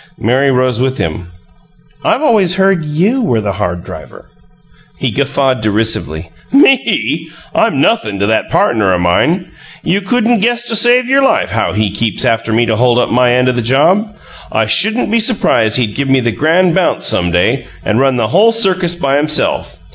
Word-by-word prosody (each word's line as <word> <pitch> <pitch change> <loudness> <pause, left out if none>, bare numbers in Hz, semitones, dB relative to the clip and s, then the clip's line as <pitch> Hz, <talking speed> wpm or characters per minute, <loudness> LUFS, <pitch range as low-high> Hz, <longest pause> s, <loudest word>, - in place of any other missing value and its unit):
Mary 130 +5 +1
rose 125 -2 0
with 130 0 -1
him. 80 +2 -4 0.8
"I've 275 - 0
always 200 - +2
heard 190 -3 +1
YOU 180 - -1
were 155 - 0
the 105 -2 -3
hard 90 -3 -4
driver." - - -12 0.7
He - - -2
guffawed 135 -3 -1
derisively. 105 -6 -2 0.2
"Me? 270 -2 +2 0.3
I'm - - 0
nothin' 105 - 0
to 100 - -1
that 110 +1 -1
partner 105 -5 +1
o' - - -1
mine. 160 - 0 0.3
You 190 +5 0
couldn't 235 +3 0
guess 240 +3 0
to 230 - -1
save 240 +3 +4
your 270 +1 +2
life 270 - +1
how 110 -3 -1
he 105 -1 -1
keeps 110 +2 -1
after 115 0 -1
me 115 +2 +2
to 110 -2 -1
hold 120 0 +2
up 125 - 0
my 125 0 +2
end 125 +1 +1
o' - - +3
the 120 -1 -2
job. 180 - +1 0.4
I 110 - 0
shouldn't 210 - +1
be 230 - +2
surprised 165 - +1
he'd 115 -5 -1
give 140 -1 -3
me 135 0 +3
the 120 -2 -1
grand 165 +7 +1
bounce 185 -1 0
some 90 - +1
day, 90 +10 0 0.2
and 110 +2 0
run 135 -1 +1
the 115 -3 -1
whole 210 - +3
circus 185 -6 +1
by 140 -5 0
himself. 150 +1 -2
135 Hz, 185 wpm, -13 LUFS, -, 0.8 s, save